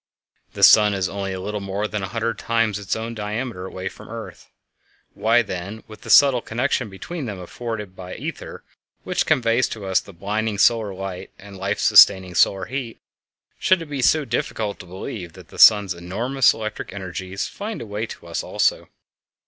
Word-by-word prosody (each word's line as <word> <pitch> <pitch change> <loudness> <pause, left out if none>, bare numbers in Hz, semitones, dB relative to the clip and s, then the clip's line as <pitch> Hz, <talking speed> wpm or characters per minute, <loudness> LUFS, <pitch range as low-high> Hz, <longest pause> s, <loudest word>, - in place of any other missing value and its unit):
The - - -3
sun 105 -2 +7
is 95 -1 0
only 100 -1 -4
a 95 - -4
little 105 +3 -4
more 100 +2 -3
than 105 -1 -4
a 95 - -3
hundred 115 +2 -3
times 115 -3 0
its 100 -2 -2
own 115 +1 -4
diameter 105 -2 -4
away 95 0 -6
from - - -9
the - - -9
earth. 115 - -10 0.6
Why, 115 +2 +3
then, 100 +2 -6
with 110 - -13
the - - -11
subtle 135 -4 +6
connection 125 0 -1
between 140 - -6
them 105 -3 -5
afforded 105 +1 -6
by 90 -1 -8
the - - -9
ether - - -7 0.4
which - - -1
conveys 120 0 +2
to 105 -3 -7
us 95 -1 +2
the - - -12
blinding 105 +4 -2
solar 110 -1 +3
light 95 0 -6
and 100 +1 -13
the - - -11
life 100 +2 -1
sustaining 95 -2 +6
solar 95 +2 +3
heat, 125 0 -5 0.6
should 185 -3 +3
it 150 - -13
be 140 -2 -2
so 155 +3 +3
difficult 110 -3 -3
to 90 - -11
believe 90 -1 -7
that - - -14
the - - -12
sun's 105 -4 +7
enormous 110 +10 +1
electric 110 -1 -6
energies 95 0 -5
find 215 +2 -6
a - - -6
way 105 +2 -4
to - - -11
us 85 -1 -3
also? - - 0
105 Hz, 195 wpm, -22 LUFS, 95-115 Hz, 0.6 s, sun